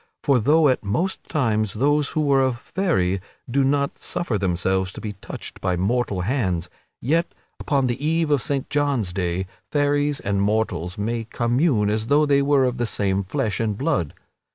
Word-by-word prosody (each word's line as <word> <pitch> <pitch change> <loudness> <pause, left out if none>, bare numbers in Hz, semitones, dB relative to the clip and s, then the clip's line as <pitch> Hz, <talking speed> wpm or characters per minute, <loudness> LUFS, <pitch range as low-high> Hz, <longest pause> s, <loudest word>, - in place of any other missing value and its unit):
For 140 -3 +3
though 150 +6 +4
at 130 -4 +1
most 165 - -1
times 110 - 0
those 145 +4 +2
who 150 -2 0
are 135 -1 +5
of 130 -2 +1
Faery 100 - 0 0.3
do 135 +3 +1
not 140 +1 0
suffer 130 -10 -2
themselves 95 0 0
to - - -8
be 105 -1 -5
touched 100 - -9
by 90 - 0
mortal 100 0 0
hands, 90 -6 -1 0.3
yet, 165 +7 0 0.2
upon 140 -3 +1
the 125 +3 -2
Eve 160 0 +1
of 145 -3 +3
Saint 140 0 -1
John's 140 -10 0
Day, 90 0 -1 0.3
fairies 145 0 +1
and 100 -1 -1
mortals 100 -4 -1
may 115 +2 -2
commune 120 -1 +1
as 110 +1 -1
though 150 +3 +4
they 140 -1 +3
were 140 -1 +3
of 125 0 -1
the 120 -1 0
same 100 -2 0
flesh 110 0 -2
and 110 -3 -1
blood. 85 -7 -1
120 Hz, 175 wpm, -23 LUFS, 100-145 Hz, 0.3 s, are